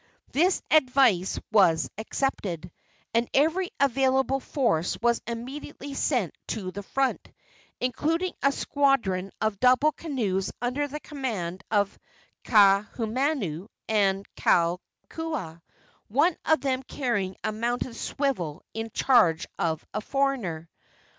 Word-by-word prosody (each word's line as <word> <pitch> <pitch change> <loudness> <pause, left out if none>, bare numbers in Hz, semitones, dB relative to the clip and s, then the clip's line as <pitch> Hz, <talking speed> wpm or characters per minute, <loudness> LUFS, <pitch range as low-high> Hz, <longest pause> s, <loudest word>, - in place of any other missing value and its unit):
This 355 +6 +2
advice 255 - +4
was 165 -9 +4
accepted, 195 - -3 0.4
and 230 +1 +1
every 325 +6 +2
available 265 0 +2
force 185 - 0
was 235 +1 +2
immediately 270 +4 -6
sent 245 - 0
to 190 -5 -3
the 200 - -6
front, 270 +6 -1 0.5
including 325 +8 0
a 275 - +4
squadron 255 -11 +1
of 215 -3 0
double 255 +4 +5
canoes 230 - -2
under 255 +5 -1
the 295 +2 -6
command 215 - -4
of 205 -2 +1 0.5
Kaahumanu 215 - +2 0.2
and 200 -2 +2
Kalakua, 175 - -1 0.5
one 300 - +3
of 315 0 +3
them 265 -2 0
carrying 220 -8 -2
a - - 0
mounted 235 +2 -2
swivel 230 - -2
in 225 0 -4
charge 220 -10 +3
of 160 -2 -1
a 215 - -2
foreigner. 230 -12 -1
235 Hz, 110 wpm, -27 LUFS, 195-275 Hz, 0.5 s, double